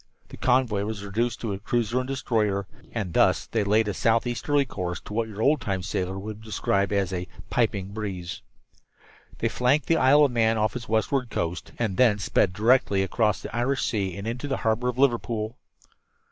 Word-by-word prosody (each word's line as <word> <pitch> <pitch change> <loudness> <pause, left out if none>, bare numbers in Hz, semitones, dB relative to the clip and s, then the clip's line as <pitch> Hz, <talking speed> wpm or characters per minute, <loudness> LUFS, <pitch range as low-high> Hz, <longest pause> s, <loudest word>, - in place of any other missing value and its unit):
The - - -10
convoy 125 -5 +2
was 105 -2 -5
reduced 115 +4 -1
to 110 -4 -2
a 95 - -5
cruiser 120 +3 0
and 130 - -3
destroyer, 110 -7 0 0.3
and 100 -7 -3
thus - - +3
they 110 -2 -1
laid 105 +2 +2
a 105 - -1
southeasterly 120 +6 +1
course 90 -7 -4
to - - -10
what 115 +1 0
your 110 0 -4
old 145 -1 +3
time 95 -3 -2
sailor 95 +1 -2
would 105 +2 -6
have 110 - -15
described 100 -2 0
as 100 -2 0
"a 90 0 -3 0.2
piping 105 -5 0
breeze." 100 -4 -5 1.0
They - - 0
flanked 130 +4 +2
the 165 - +2
Isle 145 +2 +6
of 140 - 0
Man 115 -1 +2
off 110 +2 0
its 120 -2 -6
westward 120 +3 +1
coast, 85 -4 -3
and 110 -6 -1
thence 105 -6 +4
sped 95 - +2
directly 105 -1 +3
across 105 +1 0
the - - -6
Irish 130 +3 0
Sea 100 -4 -1
and 100 - -6
into 125 +5 -3
the 135 - -1
harbor 115 +3 +1
of 125 - -4
Liverpool. 120 -3 0
110 Hz, 195 wpm, -26 LUFS, 100-125 Hz, 1.0 s, Isle